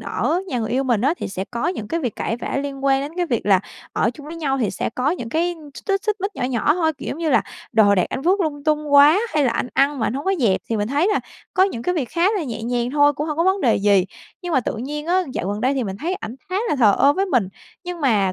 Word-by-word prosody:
ở 355 - -1
nhà 250 - -2
người 220 -2 -3
yêu 265 +2 +1
mình 240 -5 +1
á, 280 +8 +2
thì - - -5
sẽ 190 0 -4
có 235 +5 -1
những 220 - -4
cái 335 - -1
việc 245 -8 -3
cãi 225 - -2
vã 240 - -4
liên 275 -1 -6
quan 270 -1 +3
đến 285 +3 -5
cái 355 -1 0
việc 235 -6 -2
là 190 -2 +5 0.3
ở 225 - +1
chung 295 -1 -11
với 325 - -7
nhau 275 -4 -1
thì 225 -6 0
sẽ - - -3
có 260 +4 +1
những 240 -10 -4
cái 345 +5 0 0.2
x - - -8
xích 390 0 +1
xích 425 -1 0
mích 395 +1 -3
nhỏ - - -4
nhỏ 255 +4 +1
thôi. 320 -3 +1
Kiểu - - -6
giống 315 - -4
như 325 -3 0
là - - +4 0.3
đồ 205 -2 +5
đạc 180 - +2
anh - - -4
vứt 375 +5 +2
lung 290 -4 -2
tung 300 -1 0
quá 290 +6 +7 0.2
hay 295 - +3
là 250 - +2
anh 240 +2 -2
ăn 275 +1 +2
mà 220 - 0
anh - - -2
hông 280 - -4
có 385 - +2
dẹp, 200 -6 +2
thì 225 - +1
mình 205 +1 -1
thấy 290 +8 +2
là - - +1 0.3
có 375 - +4
những 305 -12 0
cái 360 - 0
việc 280 -8 -2
khá 340 0 -1
là 370 - -1
nhẹ 235 -4 -5
nhàng 240 +1 -1
thôi, 290 0 +4
cũng 295 +3 -4
hông 300 - -3
có 335 - +2
vấn 380 +1 +2
đề 245 -6 +3
gì. 200 -2 +3 0.4
Nhưng 350 -2 -4
mà 260 - +3
tự 225 - -3
nhiên 295 +6 -5
á, 370 +2 +2
dạo 180 - -3
gần 205 +1 -3
đây 260 +3 +1
thì 260 -3 -1
mình 190 -1 -4
thấy 345 - -2
ảnh 225 -8 -7
khá 370 - -2
là 295 - +1
thờ 215 -6 +5
ơ 280 +1 +5
với 390 +4 0
mình, 245 - +1 0.4
nhưng 355 -1 -5
mà, 210 -9 +2
275 Hz, 310 wpm, -21 LUFS, 235-330 Hz, 0.4 s, quá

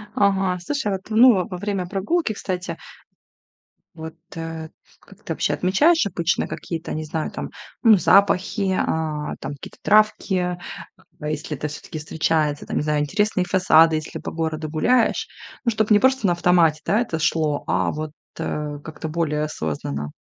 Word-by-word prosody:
Ага, 195 -2 +2
слушай, 240 +3 -2
вот, 190 -1 -2
ну, 220 -3 +5
во 185 - -6
время 195 -2 -2
прогулки, 215 - -1
кстати 185 -2 -4 1.2
вот, 160 0 -8 0.2
э, 165 -1 -6 0.3
как - - -18
ты - - -3
вообще - - 0
отмечаешь 290 - +3
обычно 170 -2 0
какие-то, 165 -1 -5
не 155 - -3
знаю, 155 +1 -3
там, - - -5 0.3
ну, 220 -4 +7
запахи, 195 +1 +3
а, 155 -2 -2
там, - - -5
какие-то 140 - -11
травки, 215 -1 +3
э, 180 -1 0 0.7
если 150 -1 -4
это 150 - -3
всё-таки 150 +2 -8
встречается? 155 -1 0
Там, - - -2
не - - 0
знаю, 150 -1 +1
интересные 195 +4 0
фасады, 165 -3 +5
если 155 0 -4
по - - -6
городу 160 -1 -3
гуляешь. 230 +10 +2 0.4
Ну, 235 - +3
чтобы 220 0 0
не 205 - +7
просто 260 -5 +3
на 175 - +3
автомате, 170 -3 +3
да, 210 +4 +2
это 195 -9 -2
шло, 150 -1 0
а - - +1
вот, 155 0 -5 0.3
э, 150 -1 -3
как-то 155 0 -7
более 150 -2 -1
осознанно. 75 - -4
175 Hz, 160 wpm, -22 LUFS, 155-200 Hz, 1.2 s, ну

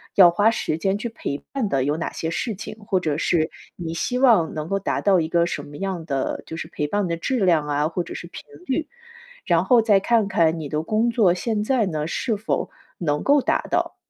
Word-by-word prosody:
要 180 -3 +9
花 205 +6 +3
时 155 -7 -2
间 195 +4 0
去 215 - -4
陪 225 -11 -4 0.2
伴 255 -7 -1
的 135 -5 +1
有 145 +2 +1
哪 170 - -3
些 160 - -4
事 220 +7 -2
情， 215 +2 -8
或 190 -2 +1
者 155 -4 -1
是 160 -1 +1 0.3
你 165 -1 -4
希 245 +9 -1
望 230 -11 +4
能 155 0 -4
够 195 - 0
达 195 - -1
到 190 -3 +3
一 160 - -3
个 170 0 +3
什 170 - -3
么 145 0 -11
样 190 -3 -3
的 135 -3 -2
就 160 - -7
是 - - -5
陪 150 - -3
伴 205 +5 0
的 170 - -1
质 225 +3 0
量 160 -4 +3
啊， 145 +1 0
或 170 +1 -2
者 - - -9
是 - - -7
频 - - -9 0.2
率。 305 +4 -2 0.6
然 170 -1 +3
后 240 0 +5
再 210 -3 +4
看 225 -2 +2
看 165 -4 +2
你 150 - -5
的 150 +1 -1
工 220 +7 +1
作 220 -7 +3
现 210 +3 -1
在 240 0 +2
呢， 155 -3 -2
是 225 +6 -1
否 215 - -2 0.3
能 150 -4 -1
够 285 0 +4
达 - - +1
到。 - - 0
180 Hz, 255 characters per minute, -23 LUFS, 160-215 Hz, 0.6 s, 要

